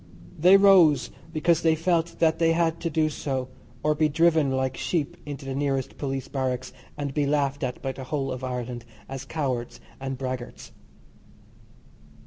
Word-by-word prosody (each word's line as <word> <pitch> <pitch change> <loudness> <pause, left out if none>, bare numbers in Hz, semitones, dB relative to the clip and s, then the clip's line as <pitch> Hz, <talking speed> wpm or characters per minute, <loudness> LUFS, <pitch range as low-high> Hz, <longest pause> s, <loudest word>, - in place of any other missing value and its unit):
They 180 +4 +7
rose 180 -9 +5 0.2
because 165 +1 +2
they 160 -1 +3
felt 170 0 0
that 160 -1 +2
they 165 -1 +4
had 165 -1 +1
to 170 - -2
do 155 0 +2
so, 135 -4 -3 0.3
or 150 - +3
be 155 0 +2
driven 160 -1 +3
like 130 0 -1
sheep 155 -5 -2
into 145 -1 -6
the 135 - -3
nearest 135 -1 -2
police 135 -2 -3
barracks, 130 -2 -3 0.2
and 140 -2 -3
be 145 0 +1
laughed 140 -1 0
at 125 -2 -4
by 135 - -1
the 130 0 -8
whole 135 0 -2
of 130 0 -5
Ireland 125 -2 -4 0.2
as 135 0 -6
cowards 130 -5 -3 0.2
and 135 -1 -4
braggarts. 130 -2 -6
145 Hz, 165 wpm, -26 LUFS, 130-160 Hz, 0.3 s, They